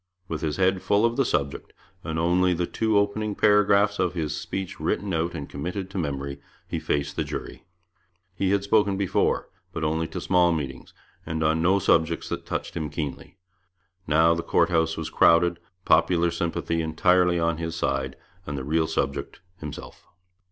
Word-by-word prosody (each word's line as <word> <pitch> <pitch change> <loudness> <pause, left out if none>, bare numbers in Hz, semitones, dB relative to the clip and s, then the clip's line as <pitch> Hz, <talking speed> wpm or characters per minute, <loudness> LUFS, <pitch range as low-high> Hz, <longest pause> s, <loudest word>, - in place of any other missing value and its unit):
With 80 -3 -4
his 75 -2 -2
head 95 0 +2
full 105 +2 +2
of 115 0 +1
the 135 - +3
subject, 70 - -2 0.3
and 80 -1 -3
only 90 +2 +2
the 90 +1 0
two 110 +3 0
opening 100 +1 0
paragraphs 105 -1 +4
of 90 0 0
his 80 -4 -2
speech 95 -1 -5
written 100 -1 -1
out 85 +1 -1
and 75 -3 -5
committed 90 +6 -5
to 95 - -3
memory, 70 -3 -4 0.3
he - - -3
faced 70 0 -2
the - - +1
jury. - - -7 0.7
He 95 -1 0
had 100 0 +2
spoken 100 -1 +2
before, 100 -2 +1 0.2
but 80 - -4
only 80 +1 0
to - - -6
small 90 -2 +3
meetings, 70 -4 -5 0.3
and 80 0 -3
on 80 +1 +2
no 95 +4 +4
subjects 85 -3 +1
that - - -5
touched - - -4
him 80 -2 -3
keenly. 75 +4 -6 0.7
Now 80 +2 +4
the 85 - -2
Court 85 +1 +2
House 80 -1 +1
was 80 - -4
crowded, 85 +1 +4 0.3
popular 85 +1 +3
sympathy 85 0 -2
entirely 90 +2 +3
on 85 -1 +1
his 80 -1 -3
side, 65 -4 -1 0.3
and 75 -1 -3
the 65 - -4
real 80 +3 +1
subject 70 -1 -3 0.2
himself. 75 -4 -9
85 Hz, 175 wpm, -25 LUFS, 80-95 Hz, 0.7 s, paragraphs